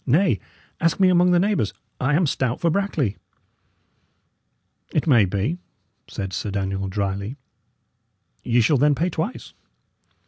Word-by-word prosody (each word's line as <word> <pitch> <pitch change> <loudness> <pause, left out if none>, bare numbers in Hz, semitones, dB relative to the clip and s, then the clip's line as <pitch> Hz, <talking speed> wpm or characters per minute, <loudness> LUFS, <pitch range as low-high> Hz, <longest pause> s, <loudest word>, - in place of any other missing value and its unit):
Nay; 140 - +3 0.4
ask 165 +1 +1
me 190 -1 +5
among 180 0 +4
the 180 - +4
neighbours, 180 - 0 0.2
I 135 +3 +1
am 175 +2 +3
stout 130 -4 -1
for 170 - +2
Brackley." 160 - -1 1.7
"It 150 - 0
may 120 -10 +5
be," 100 - -2 0.5
said 95 -1 -5
Sir 105 - -3
Daniel, 95 -1 -2
dryly. 100 +5 -3 1.1
"Ye 120 0 +3
shall 140 +6 +3
then 145 +2 +3
pay 175 +5 0
twice." 165 +10 -4
135 Hz, 135 wpm, -23 LUFS, 100-170 Hz, 1.7 s, me